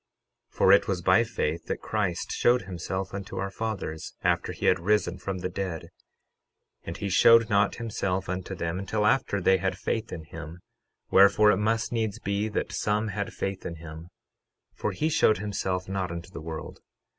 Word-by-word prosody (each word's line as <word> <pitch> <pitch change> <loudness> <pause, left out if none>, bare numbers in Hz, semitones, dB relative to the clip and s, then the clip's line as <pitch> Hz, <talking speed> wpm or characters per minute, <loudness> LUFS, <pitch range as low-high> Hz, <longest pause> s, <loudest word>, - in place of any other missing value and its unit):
12:7 - - -24
For 95 - +5
it 100 - +6
was 95 -3 -1
by 95 +6 +5
faith 85 -8 -2
that - - -2
Christ 100 -6 -2
showed 120 -2 +3
himself 95 +1 -4
unto 100 0 -6
our 95 +1 -2
fathers, 95 -8 -4
after - - +1
he - - -5
had - - +4
risen 95 -1 +1
from 95 -1 -4
the 90 - -3
dead; 90 -3 -4 0.9
and - - -6
he 100 - -3
showed 115 +3 +6
not 100 0 +3
himself 100 -5 -2
unto 95 +1 -4
them 85 +1 -3
until 105 +2 -1
after 105 -3 +2
they 95 0 +4
had - - -2
faith 110 0 -2
in 80 - -6
him; 80 +1 -9 0.5
wherefore, 100 +2 +6
it 95 - +2
must 110 +2 0
needs 110 -3 -1
be 100 -1 -1
that 105 - -2
some 105 +1 0
had 100 0 -3
faith 95 -1 -4
in 85 - -5
him, 80 +1 -10 0.6
for - - -2
he 155 - -1
showed 110 -8 +3
himself 95 -3 -2
not 95 -1 -2
unto 85 +1 -7
the 70 - -8
world. 80 0 -7
95 Hz, 185 wpm, -27 LUFS, 90-105 Hz, 0.9 s, it